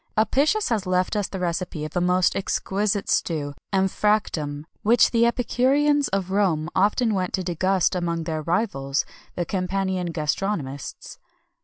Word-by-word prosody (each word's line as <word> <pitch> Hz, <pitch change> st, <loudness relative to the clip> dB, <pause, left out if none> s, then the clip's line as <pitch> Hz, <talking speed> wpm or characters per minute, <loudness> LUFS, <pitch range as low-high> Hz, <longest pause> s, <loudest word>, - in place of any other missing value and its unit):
Apicius 280 Hz, -, +2 dB
has 215 Hz, -5 st, -1 dB
left 185 Hz, +2 st, +1 dB
us 205 Hz, -2 st, 0 dB
the 195 Hz, -, -6 dB
recipe 175 Hz, -3 st, -2 dB
of 155 Hz, -, -8 dB
a 180 Hz, -, +1 dB
most 180 Hz, +1 st, +2 dB
exquisite 200 Hz, +1 st, -1 dB
stew, 145 Hz, -4 st, 0 dB, 0.2 s
emphractum, 190 Hz, -7 st, 0 dB, 0.2 s
which 230 Hz, +3 st, +4 dB
the 235 Hz, 0 st, +4 dB
epicureans 275 Hz, +4 st, +2 dB
of 190 Hz, -1 st, -2 dB
Rome 175 Hz, -5 st, +1 dB
often 210 Hz, +4 st, +2 dB
went 185 Hz, -2 st, -1 dB
to 185 Hz, -, -1 dB
degust 185 Hz, +1 st, +1 dB
among 170 Hz, -2 st, -1 dB
their 160 Hz, -1 st, -3 dB
rivals, 155 Hz, -5 st, -1 dB, 0.3 s
the 175 Hz, -, -1 dB
Campanian 185 Hz, -1 st, -1 dB
gastronomists. 150 Hz, -3 st, -3 dB
185 Hz, 140 wpm, -24 LUFS, 170-210 Hz, 0.3 s, which